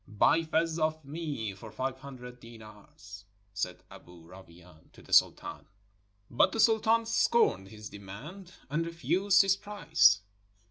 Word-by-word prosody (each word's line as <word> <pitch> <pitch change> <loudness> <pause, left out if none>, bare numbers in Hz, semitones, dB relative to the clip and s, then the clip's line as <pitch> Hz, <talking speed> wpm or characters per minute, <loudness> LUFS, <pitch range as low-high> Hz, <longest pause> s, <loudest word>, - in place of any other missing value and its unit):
"Buy 105 +10 +3
Fez 160 +1 -1
of 155 -1 -1
me 140 -8 -5
for 105 +3 -12
five 130 +3 -4
hundred 125 -3 -11
deendrs,^' 105 -3 -14 0.3
said 95 -3 -4
Aboo 85 -1 -15
Rawain 85 -2 -17
to - - -17
the - - -9
Sultan. - - +2 0.6
But 120 - +2
the 225 - -3
Sultan 225 +1 +3
scorned 225 - +2
his 105 +1 -10
demand 140 - -11
and 150 +4 -1
refused 185 +4 +2
his 195 -1 +2
price. 160 - +2
130 Hz, 135 wpm, -29 LUFS, 100-170 Hz, 0.6 s, Buy